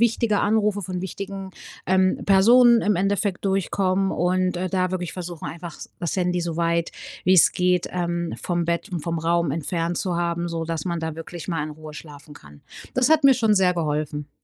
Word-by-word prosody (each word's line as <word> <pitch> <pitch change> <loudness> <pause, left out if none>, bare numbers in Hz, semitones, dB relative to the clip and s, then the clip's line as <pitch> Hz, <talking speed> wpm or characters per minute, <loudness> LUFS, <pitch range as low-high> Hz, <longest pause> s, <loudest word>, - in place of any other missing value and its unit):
wichtige 230 -2 +2
Anrufe 210 -1 +1
von 180 -1 -4
wichtigen, 195 0 -6 0.4
ähm, 185 0 +2
Personen 235 +5 +6
im 210 -4 +1
Endeffekt 195 0 0
durchkommen 195 0 0
und, 180 0 0
äh, 185 +1 -3
da 185 -1 0
wirklich 180 -2 -3
versuchen, 175 -3 -7
einfach 170 -1 -7 0.2
das 170 +1 -3
Handy 180 -1 0
so 170 -1 -3
weit 170 0 0 0.3
wie's 185 -2 +6
geht, 180 -1 +1
ähm, 170 -1 -2
vom 175 -1 -1
Bett 170 0 -2
und 175 - -3
vom 170 -1 -2
Raum 170 -1 +1
entfernt 165 +3 -2
zu 180 -3 -1
haben, 170 0 -1
so 165 -1 -3
dass 165 -1 -4
man 170 -2 -2
da 160 -1 -3
wirklich 165 +1 -8
mal 165 -4 -1
in 155 - -5
Ruhe 155 0 -10
schlafen 150 -1 -11
kann. 75 - -15 0.3
Das 255 +3 +2
hat 310 -2 +4
mir 270 -1 +8
schon 225 -3 +2
sehr 185 -2 +3
geholfen. 150 -2 -3
175 Hz, 190 wpm, -23 LUFS, 165-190 Hz, 0.4 s, mir